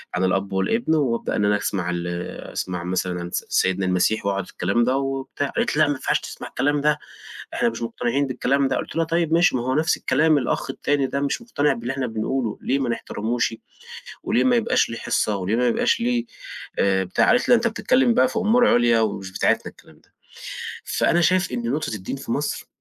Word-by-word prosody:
عن 90 Hz, -, 0 dB
الأب 95 Hz, +1 st, 0 dB
والإبن، 160 Hz, -, +1 dB
وأبدأ 130 Hz, -7 st, 0 dB
إن 105 Hz, -, +1 dB
أنا 105 Hz, 0 st, +3 dB
أسمع 95 Hz, -3 st, -2 dB
ال 85 Hz, 0 st, -2 dB, 0.5 s
أسمع 90 Hz, -1 st, -3 dB
مثلًا 90 Hz, -1 st, -2 dB
س -, -, -2 dB
سيدنا 95 Hz, 0 st, +1 dB
المسيح 95 Hz, +4 st, +1 dB
واعرف 100 Hz, -2 st, -2 dB
الكلام 100 Hz, +6 st, +1 dB
ده 130 Hz, +3 st, +2 dB
وبتاع؟ 135 Hz, +1 st, -3 dB
قالت: -, -, -1 dB
"لأ، 155 Hz, -1 st, +5 dB
ما 145 Hz, -, +1 dB
ينفعش 130 Hz, -, 0 dB
تسمع -, -, -8 dB
الكلام 145 Hz, +1 st, 0 dB
ده، 150 Hz, 0 st, +2 dB, 0.5 s
إحنا -, -, +2 dB
مش 115 Hz, 0 st, -7 dB
مقتنعين 125 Hz, +4 st, -1 dB
بالكلام 135 Hz, +1 st, +1 dB
ده."، 130 Hz, -, 0 dB
قلت -, -, -5 dB
لها: 165 Hz, 0 st, +1 dB
"طيب 165 Hz, 0 st, 0 dB
ماشي، 170 Hz, -4 st, +4 dB
ما 120 Hz, -, -2 dB
هو 130 Hz, +1 st, 0 dB
نفس 160 Hz, +3 st, +2 dB
الكلام 150 Hz, +3 st, +3 dB
الأخ 125 Hz, -, -1 dB
التاني 140 Hz, -2 st, 0 dB
ده 140 Hz, +1 st, -2 dB
مش 140 Hz, +10 st, -1 dB
مقتنع 150 Hz, -11 st, +1 dB
باللي 120 Hz, +3 st, -4 dB
إحنا 135 Hz, -2 st, -2 dB
بنقوله، 110 Hz, +1 st, -2 dB
ليه 135 Hz, +2 st, 0 dB
ما 135 Hz, -, -1 dB
نحترموش؟ 115 Hz, 0 st, -2 dB, 0.7 s
وليه -, -, +1 dB
ما 250 Hz, -2 st, +4 dB
يبقاش 230 Hz, -, +2 dB
ليه 115 Hz, -, -5 dB
حصة؟ 105 Hz, -2 st, 0 dB
وليه 100 Hz, +4 st, -1 dB
ما 125 Hz, 0 st, +2 dB
يبقاش 120 Hz, -, +2 dB
ليه 120 Hz, 0 st, 0 dB, 0.5 s
آآ 95 Hz, -1 st, +2 dB
بتاع؟" 90 Hz, -, +1 dB
قالت 245 Hz, -, +2 dB
لي: 245 Hz, -, +7 dB
"لأ، -, -, +7 dB
أنت 235 Hz, 0 st, +1 dB
بتتكلم 250 Hz, +2 st, +2 dB
بقى 250 Hz, -, +4 dB
في 230 Hz, -, -8 dB
أمور 220 Hz, +3 st, +3 dB
عُليا 120 Hz, -1 st, +4 dB
ومش 100 Hz, -3 st, -2 dB
بتاعتنا -, -, +1 dB
الكلام -, -, -20 dB
ده". -, -, -33 dB, 0.7 s
فأنا 170 Hz, -, +1 dB
شايف 185 Hz, -2 st, +2 dB
إن 120 Hz, -1 st, -2 dB
نقطة 150 Hz, -5 st, -2 dB
الدين 105 Hz, +6 st, -5 dB
في 135 Hz, -3 st, -5 dB
مصر 145 Hz, +3 st, -2 dB
125 Hz, 210 wpm, -23 LUFS, 105-150 Hz, 0.7 s, لي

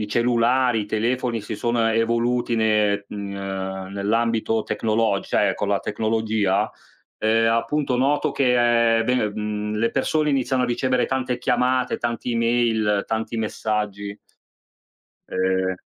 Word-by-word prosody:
i -, -, -3 dB
cellulari, 120 Hz, +1 st, +2 dB
i -, -, -3 dB
telefoni 115 Hz, +2 st, -1 dB
si 105 Hz, +2 st, -6 dB
sono 120 Hz, +2 st, -1 dB
a 115 Hz, 0 st, +2 dB
evoluti 115 Hz, +1 st, +1 dB
ne 105 Hz, -2 st, +2 dB
ehm, 95 Hz, -2 st, -5 dB
nell'ambito 110 Hz, +2 st, 0 dB
tecnologi 110 Hz, -1 st, 0 dB
cioè 100 Hz, -2 st, +2 dB
con 100 Hz, -, -3 dB
la 100 Hz, -1 st, +2 dB
tecnologia, 110 Hz, -2 st, 0 dB, 0.5 s
ehm, 115 Hz, +1 st, +2 dB
appunto 125 Hz, +3 st, 0 dB
noto 140 Hz, +3 st, +1 dB
che, 120 Hz, -3 st, +3 dB
ehm, 115 Hz, -, 0 dB
beh, 125 Hz, -4 st, +1 dB
mhmm, 105 Hz, 0 st, -3 dB
le 115 Hz, +2 st, +1 dB
persone 155 Hz, -1 st, 0 dB
iniziano 130 Hz, -2 st, +1 dB
a -, -, -1 dB
ricevere 125 Hz, +1 st, 0 dB
tante 130 Hz, -2 st, -2 dB
chiamate, 125 Hz, +1 st, +1 dB
tanti 120 Hz, +1 st, -3 dB
email, 115 Hz, -3 st, +1 dB
tanti 110 Hz, 0 st, -3 dB
messaggi. 105 Hz, -2 st, -3 dB, 1.1 s
Ehm 95 Hz, 0 st, 0 dB
115 Hz, 130 wpm, -23 LUFS, 105-120 Hz, 1.1 s, che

